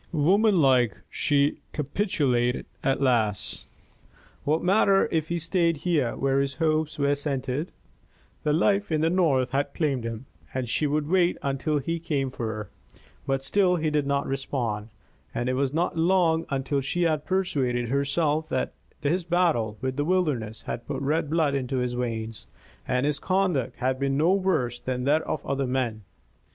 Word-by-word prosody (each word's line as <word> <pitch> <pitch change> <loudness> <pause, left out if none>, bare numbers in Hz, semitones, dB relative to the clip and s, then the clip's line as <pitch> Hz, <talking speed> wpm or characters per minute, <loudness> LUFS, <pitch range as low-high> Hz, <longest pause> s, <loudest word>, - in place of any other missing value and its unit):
Womanlike, 155 - +3
she 145 0 +1
capitulated 140 - 0 0.2
at 135 +1 +1
last. 110 -6 0 0.8
What 155 +3 +1
matter 195 +1 +4
if 160 -1 0
he 170 - -1
stayed 170 0 +1
here 150 -10 +1
where 135 0 +1
his 140 0 -1
hopes 155 -1 0
were 140 0 +2
centred? 140 +1 -2 0.7
This 150 0 +2
life 200 +3 +2
in 155 -1 +1
the 165 +1 +2
North 140 -9 +2
had 140 +1 -1
claimed 140 -7 0
him, 115 +2 -5 0.3
and 130 -2 -1
she 150 +6 +1
would 145 +1 0
wait 180 0 +3
until 140 +2 0
he 165 +4 -2
came 140 -5 -1
for 120 -3 -4
her. 110 -2 -5 0.6
But 135 0 0
still 180 +5 +3
he 155 -2 0
did 150 -2 +1
not 140 0 +1
respond, 120 -6 -3 0.5
and 120 +1 -1
it 130 - +1
was 135 0 0
not 165 +4 0
long 165 -1 +2
until 140 0 -1
she 175 +6 -1
had 155 -3 +1
persuaded 135 -11 0
herself 145 +3 0
that 130 - -1 0.3
his 170 +5 +1
battle 165 -12 +1
with 130 0 -2
the 145 - +1
wilderness 145 -11 0
had 120 - -5
put - - -3
red 150 +2 0
blood 155 -3 +2
into 135 -1 -1
his 125 -1 -1
veins, 115 -2 -4 0.4
and 125 +1 +1
his 145 -1 0
conduct 185 -10 0
had 130 +1 -1
been 135 0 0
no 165 +5 +4
worse 160 -12 0
than 125 -1 -3
that 150 +4 +3
of - - -3
other 135 -1 -1
men. 125 -4 -1
140 Hz, 165 wpm, -26 LUFS, 130-165 Hz, 0.8 s, matter